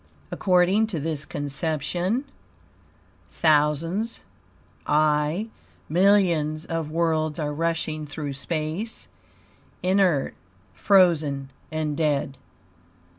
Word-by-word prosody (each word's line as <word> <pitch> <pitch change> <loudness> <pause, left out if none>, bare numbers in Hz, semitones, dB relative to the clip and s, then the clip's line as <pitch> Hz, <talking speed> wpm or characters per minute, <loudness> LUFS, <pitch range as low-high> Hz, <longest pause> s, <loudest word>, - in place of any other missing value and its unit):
According 185 +3 +3
to 185 -7 -3
this 150 -1 -3
conception, 160 - -2 1.0
"thousands, 160 +8 +1 0.7
aye, 150 +7 +2 0.4
millions 170 -4 +2
of 165 -2 -3
worlds 155 -1 0
are 150 -2 -2
rushing 160 -1 -2
through 145 -1 -5
space, 160 +9 -3 0.7
inert, 180 -6 +2 0.4
frozen, 155 - +3 0.2
and 155 -1 -2
dead. 145 -3 0
155 Hz, 75 wpm, -25 LUFS, 150-180 Hz, 1.0 s, According